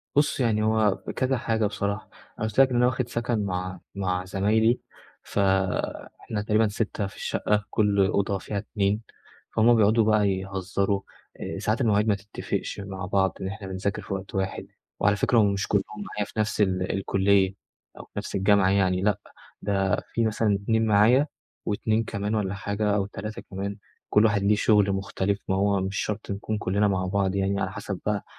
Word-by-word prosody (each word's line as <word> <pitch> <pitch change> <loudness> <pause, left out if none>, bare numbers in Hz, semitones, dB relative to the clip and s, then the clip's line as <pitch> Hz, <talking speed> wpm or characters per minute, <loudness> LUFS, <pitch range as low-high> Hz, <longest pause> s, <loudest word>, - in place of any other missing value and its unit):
بُص 145 0 +2
يعني 110 -4 +2
هو 110 -2 +3 0.2
كذا 130 0 +1
حاجة 110 -2 0
بصراحة، 100 +1 -2 0.3
أنا 110 - 0
قلت 110 +4 -2
لك 135 - +7
إن 125 - -2
أنا 120 0 +4
واخد 125 0 0
سكن 115 -3 -1
مع 90 -1 -3 0.2
مع 90 -2 -1
زمايلي، 110 +5 +2 0.4
فإحنا 95 +2 -1
تقريبًا 110 +1 +2
6 105 -1 -2
في 95 - -12
الشقة، 105 0 0
كل 100 -2 +3
أوضة 100 0 0
فيها 100 +2 -5
2 100 0 -1 0.5
فهُم 115 +2 +5
بيقعدوا 110 +1 +4
بقى 105 -2 +3
يهزروا، 95 +1 -1 0.4
آآ - - -5
ساعات 110 +5 0
المواعيد 105 -2 +3
ما 105 - +4
تتفقش 100 +1 -4
مع 95 -2 -5
بعض 95 -1 +1
إن 95 - -2
إحنا 100 0 -6
بنذاكر 95 +2 -2
في 95 - -5
وقت 95 0 -6
واحد، 95 0 -2 0.3
وعلى 105 0 +3
فكرة 120 +3 +2
هم 100 -2 +4
مش 100 +1 -2
كلهم 100 -2 +2 0.3
معايا 105 - -1
في 110 - -7
نفس 105 0 0
ال 95 -2 +1
الكلية 95 0 +2 0.4
أو - - -7
في - - -33
نفس - - -4
الجامعة 100 0 +4
يعني 95 -2 +2
لأ 105 0 +1 0.4
ده 95 -1 +1 0.2
في 115 - +1
مثلًا 110 -1 +1
2 110 +1 +2
معايا 115 +8 +5 0.4
و2 110 +2 0
كمان 105 0 -2
والّا 100 -3 -1
حاجة 100 +1 -1
أو 100 -2 +1
3 105 +2 -6
كمان 100 +2 -4 0.3
كل 105 +1 +5
واحد 105 -2 +2
ليه 105 +1 +4
شغل 105 -2 +3
مختلف 100 +1 -1
ما 95 - +1
هو 100 0 +2
مش 95 +1 -3
شرط 105 -1 -3
نكون 105 +2 -3
كلنا 105 +1 +1
مع 95 -2 0
بعض، 95 0 0
يعني 100 0 0
على 95 - -1
حسب 95 -1 -5
بقى 105 -1 -1
100 Hz, 185 wpm, -26 LUFS, 95-110 Hz, 0.5 s, لك